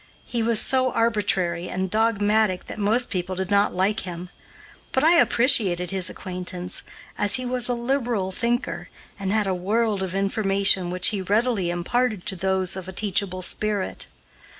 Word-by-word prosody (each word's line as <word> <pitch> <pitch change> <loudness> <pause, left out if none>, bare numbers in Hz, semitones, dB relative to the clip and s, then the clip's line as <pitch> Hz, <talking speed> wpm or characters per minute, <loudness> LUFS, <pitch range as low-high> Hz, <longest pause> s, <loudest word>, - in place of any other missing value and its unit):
He 235 - -2
was 225 -1 +2
so 260 -1 +2
arbitrary 195 -7 0
and 190 +1 -2
dogmatic 215 -3 +1
that - - -8
most 225 +4 +2
people 185 -1 -2
did 190 +1 -3
not 200 +1 +3
like 195 +4 +1
him; 180 0 -7 0.6
but 265 - +2
I 335 +2 +6
appreciated 210 - +3
his 190 -2 -1
acquaintance, 180 0 -5 0.4
as 205 -1 +2
he 255 - -1
was 250 -1 -1
a - - +2
liberal 235 -6 -1
thinker 240 +6 -2 0.3
and 195 -1 -2
had 215 0 +2
a 190 - 0
world 205 +3 0
of 190 -1 -3
information 195 -2 +1
which 180 0 +3
he 205 -3 -2
readily 205 -1 +1
imparted 210 +4 -1
to 190 - +1
those 190 0 0
of 190 -1 -7
a - - -6
teachable 190 -2 0
spirit. 210 0 -1
200 Hz, 165 wpm, -24 LUFS, 185-230 Hz, 0.6 s, I